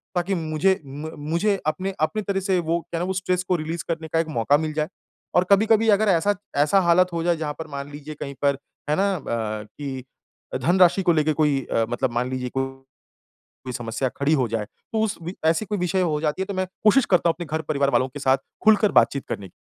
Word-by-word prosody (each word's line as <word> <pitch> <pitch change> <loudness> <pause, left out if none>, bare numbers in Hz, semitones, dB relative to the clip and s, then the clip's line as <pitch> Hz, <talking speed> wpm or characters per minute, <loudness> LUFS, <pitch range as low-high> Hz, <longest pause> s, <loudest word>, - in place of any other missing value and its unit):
ताकि 180 +2 0
मुझे 160 +3 +1
म 145 +4 -7 0.2
मुझे 195 +3 +1
अपने 190 +5 -1
अपनी 215 +7 +1
तरह 200 -1 -1
से 190 -1 +1
वो 170 +1 0
क्या 170 0 -5
ना 175 - -1
वो 190 - -1
स्ट्रेस 185 -1 -1
को 180 0 0
रिलीज़ 165 +1 -3
करने 160 -1 -3
का 165 - +3
एक 165 - 0
मौका 130 +6 +4
मिल 155 0 -3
जाए। 155 0 -1 0.5
और 180 - +5
कभी-कभी 220 +2 +4
अगर 210 +1 +4
ऐसा 195 +4 +3 0.2
ऐसा 150 +7 +4
हालत 180 +1 +4
हो 165 - -1
जाए 175 -1 +2
जहाँ 150 -2 -3
पर 160 - -5
मान 140 0 -6
लीजिए 150 +1 -8
कहीं 140 -1 -6
पर, 140 -1 +3 0.3
है 150 - +3
ना? 200 +2 +2
अ, 110 -7 -3
कि 135 -2 -6 0.6
धनराशि 180 +4 +4
को 175 -2 +4
लेके 155 0 +2
कोई 145 -3 +2
अ, 115 - +2
मतलब 125 +1 -1
मान 120 +2 -1
लीजिए 130 -1 -3
को 135 +1 -1 1.0
कोई 125 -1 -5
समस्या 120 +2 -2
खड़ी 140 +3 +2
हो 130 -5 +2
जाए। 110 -1 -2
तो 220 - -5
उस 220 -1 -1
वि 175 +3 -5
ऐसी 165 +7 +2
कोई 205 +1 -2
विषय 180 +1 0
हो 155 -4 0
जाती 155 +4 -1
है - - 0
तो 200 - -5
मैं 185 0 -1 0.2
कोशिश 235 +4 +5
करता 175 -2 +3
हूँ - - +2
अपने 175 0 -6
घर-परिवार 140 -3 0
वालों 130 - +2
के 145 - -8
साथ 135 -1 +3 0.3
खुलकर 215 -1 +5
बात-चीत 140 - +3
करने 95 -3 -5
160 Hz, 230 wpm, -23 LUFS, 140-185 Hz, 1.0 s, और